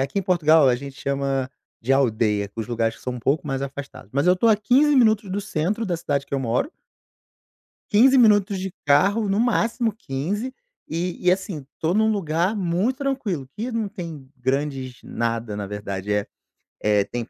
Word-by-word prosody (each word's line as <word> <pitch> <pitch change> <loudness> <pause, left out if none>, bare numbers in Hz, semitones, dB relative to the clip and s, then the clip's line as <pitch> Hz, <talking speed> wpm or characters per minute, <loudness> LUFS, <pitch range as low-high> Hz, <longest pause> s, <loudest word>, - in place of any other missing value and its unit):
aqui 140 +9 -1
em - - 0
Portugal 160 -5 +4
a 125 - +4
gente 140 +1 -8
chama 135 -1 -1 0.3
de 130 +4 +1
aldeia, 110 -6 +1
os 110 -2 -3
lugares 115 -1 -1
que - - -18
são 125 - -3
um 125 - -6
pouco 145 +5 0
mais 135 -1 -2
afastados, 140 -7 -7
mas 140 +5 +1
eu 180 - +6
tô 225 +5 +2
a 215 - +5
15 270 +8 +3
minutos 215 -5 +3
do 200 +2 -1
centro 205 +3 -2
da 175 -2 -1
cidade 140 -3 -2
que - - -5
eu 135 - 0
moro 125 - -1 1.2
15 260 +6 +6
minutos 205 -5 +4
de 190 -1 -4
carro, 195 +9 +3
no 200 +3 +1
máximo 235 -1 +1
15, 205 - -4 0.3
e 175 +2 -3
e, 180 - +7
assim, 185 -7 -4
tô 165 +2 +1
num 220 +2 +3
lugar 175 +1 0
muito 195 - 0
tranquilo, 225 - -2
que 235 +3 -3
não 225 -2 -1
tem 165 - -8
grandes 130 -1 -2
nada, 115 -2 -3
na 100 -1 -4
verdade. 100 -1 -4
É 105 -1 +1 0.6
é, 105 -1 +3
tem, 120 +3 -4
160 Hz, 185 wpm, -23 LUFS, 130-205 Hz, 1.2 s, e